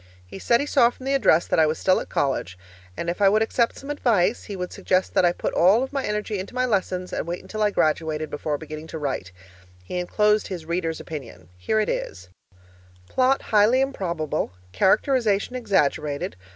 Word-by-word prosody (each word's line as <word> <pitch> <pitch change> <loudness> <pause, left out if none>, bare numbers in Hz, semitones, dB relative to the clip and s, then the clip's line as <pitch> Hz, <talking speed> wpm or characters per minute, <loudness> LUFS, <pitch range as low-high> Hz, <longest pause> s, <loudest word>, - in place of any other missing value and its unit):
He 90 - -10
said 235 +4 +3
he 285 - -1
saw 260 -5 +4
from 255 +1 -13
the 275 - 0
address 175 -11 +4
that - - +1
I 160 - +5
was 155 +1 -1
still 185 - +2
at - - -7
college, 130 -10 -1 0.4
and 170 - -4
if 175 +4 -3
I 195 - +6
would 215 +2 +3
accept 230 +1 0
some 275 +2 -6
advice, 225 -7 +1
he 205 - -6
would 180 -1 -5
suggest 185 0 0
that - - +4
I 175 - +4
put - - -4
all 200 +8 +4
of 265 - -6
my 275 -1 -1
energy 210 -1 -2
into 190 +6 -7
my 255 0 +1
lessons 185 -5 -1
and - - -3
wait 175 +1 -4
until 215 - -6
I 210 - +4
graduated 155 -3 0
before 145 0 -2
beginning 155 +1 -8
to 160 - -6
write. 135 -11 -3 0.5
He 180 - -4
enclosed 210 +4 +2
his 175 -4 -6
reader's 165 -1 -2
opinion. 135 - -9
Here 90 - 0
it 215 - +1
is: 95 0 -4 0.8
'Plot 260 +1 +2
highly 215 +4 +4
improbable. 170 - -2 0.2
Characterization 215 - +2
exaggerated. 150 - 0
185 Hz, 200 wpm, -24 LUFS, 155-220 Hz, 0.8 s, I